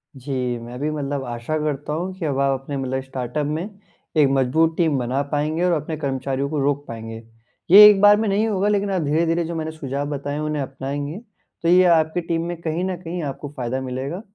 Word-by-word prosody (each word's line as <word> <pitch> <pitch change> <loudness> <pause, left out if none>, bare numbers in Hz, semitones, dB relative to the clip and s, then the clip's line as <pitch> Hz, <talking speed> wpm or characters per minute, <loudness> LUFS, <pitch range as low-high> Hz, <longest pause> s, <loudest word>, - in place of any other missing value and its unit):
जी, 130 -2 -3
मैं 120 +2 -9
भी 150 +2 -1
मतलब 145 -2 -3
आशा 120 +6 -3
करता 150 -1 -2
हूँ 180 +4 -3
कि 175 - -4
अब 140 -3 -1
आप 135 -1 +2
अपने 140 +1 -5
मतलब 130 0 -2
स्टार्टअप 130 +2 -3
में, 175 +8 -4 0.4
एक 150 -2 +6
मजबूत 140 +5 +2
टीम 160 -5 +2
बना 125 +3 -1
पाएँगे 155 +3 0
और 180 - +3
अपने 155 +1 -5
कर्मचारियों 135 -1 -2
को 155 -1 -2
रोक 145 0 0
पाएँगे। 115 -1 -7 0.5
ये 205 +3 +11
एक 205 -2 +4
बार 205 0 +7
में 220 +1 0
नहीं 205 +3 +1
होगा 205 -2 0
लेकिन 205 -1 +1
आप 185 -2 0
धीरे-धीरे 165 +3 +1
जो 170 +1 -5
मैंने 160 -1 -3
सुझाव 140 -2 -4
बताए 145 0 -4
हैं 150 - -3
उन्हें 150 -1 -2
अपनाएँगे, 140 +4 -5 0.5
तो - - +1
ये 180 +1 +6
आपकी 160 +2 0
टीम 165 0 -2
में 175 0 -4
कहीं 165 +1 -2
न 185 -1 -2
कहीं 175 0 -5
आपको 145 0 -5
फायदा 130 +1 -2
मिलेगा 130 +7 -4
150 Hz, 215 wpm, -22 LUFS, 135-165 Hz, 0.5 s, ये